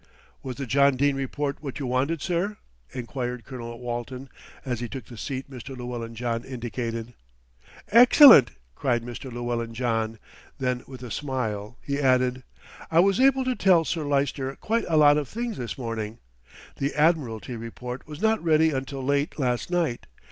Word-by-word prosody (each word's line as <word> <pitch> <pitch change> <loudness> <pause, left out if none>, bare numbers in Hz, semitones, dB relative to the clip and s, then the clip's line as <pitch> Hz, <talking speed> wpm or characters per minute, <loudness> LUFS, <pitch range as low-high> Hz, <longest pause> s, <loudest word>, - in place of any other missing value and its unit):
"Was 130 -2 -5
the 140 - -4
John 140 +2 +4
Dene 140 +1 +2
Report 140 +1 -3
what 140 -4 -6
you 140 - -4
wanted, 135 +6 0
sir?" 190 +4 -1 0.3
enquired 125 -1 -4
Colonel 120 -3 -7
Walton, 125 +2 -5 0.4
as 125 -3 -2
he 120 -1 -4
took 130 -5 -7
the 120 - -12
seat 130 +3 -5
Mr. 130 0 -9
Llewellyn 120 -2 -6
John 115 0 -2
indicated. 120 -2 -5 0.8
"Excellent," 240 - +9 0.2
cried 120 - 0
Mr. 120 +2 -7
Llewellyn 120 -1 -3
John; 115 -2 -1 0.4
then 125 -1 -1
with 130 -2 -10
a 120 - -7
smile 120 -6 -3
he 140 0 -2
added, 130 -1 +2 0.5
"I 165 - +4
was 195 +3 +4
able 265 0 +4
to 255 - +1
tell 180 -6 +4
Sir 160 -1 -2
Lyster 140 -1 -1
quite 230 +2 -1
a 160 - +2
lot 145 -1 +6
of 145 - -4
things 235 -1 -4
this 120 -2 -5
morning. 115 -3 -4 0.6
The 140 +1 -2
Admiralty 145 -7 +1
report 125 +3 -7
was 150 -1 -8
not 220 -2 +2
ready 160 -1 +4
until 135 0 -4
late 140 +2 0
last 125 -2 -1
night. 170 -9 -1
130 Hz, 165 wpm, -26 LUFS, 120-150 Hz, 0.8 s, Excellent